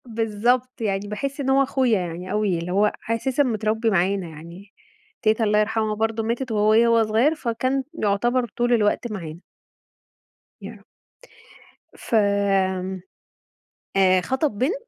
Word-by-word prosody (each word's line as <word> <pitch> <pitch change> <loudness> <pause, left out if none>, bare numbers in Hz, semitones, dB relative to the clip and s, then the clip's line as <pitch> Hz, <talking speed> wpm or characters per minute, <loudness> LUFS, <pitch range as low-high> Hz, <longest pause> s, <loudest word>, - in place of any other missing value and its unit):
بالضبط، 235 +3 -1
يعني 200 -2 -2
باحس 270 +8 -4
إن 270 -1 -1
هو 270 +1 +4
أخويا 260 -5 +1
يعني 180 +1 -6
أوي 210 -4 0
اللي 170 +2 -5
هو 205 +3 +3 0.2
أساسًا 255 +5 +1
متربي 220 -2 0
معانا 190 -1 0
يعني، 170 +6 -12 0.5
تيتة 220 -1 +2
الله 210 -1 +2
يرحمها 215 0 0
برضه 225 +1 -1
ماتت 235 +3 -3
وهي 215 +2 +4
وهو 230 -1 +4
صغيّر 235 +9 +2
فكان 260 0 -1 0.2
يعتبر 240 +5 +1
طول 240 0 +2
الوقت 225 +1 +1
معانا. 170 -5 -7 1.2
يا - - -7
رب. - - -17 1.1
ف - - -3 1.8
آآ، 185 -1 +4
خطب 265 - 0
بنت 265 - +1
220 Hz, 135 wpm, -23 LUFS, 200-245 Hz, 1.8 s, هو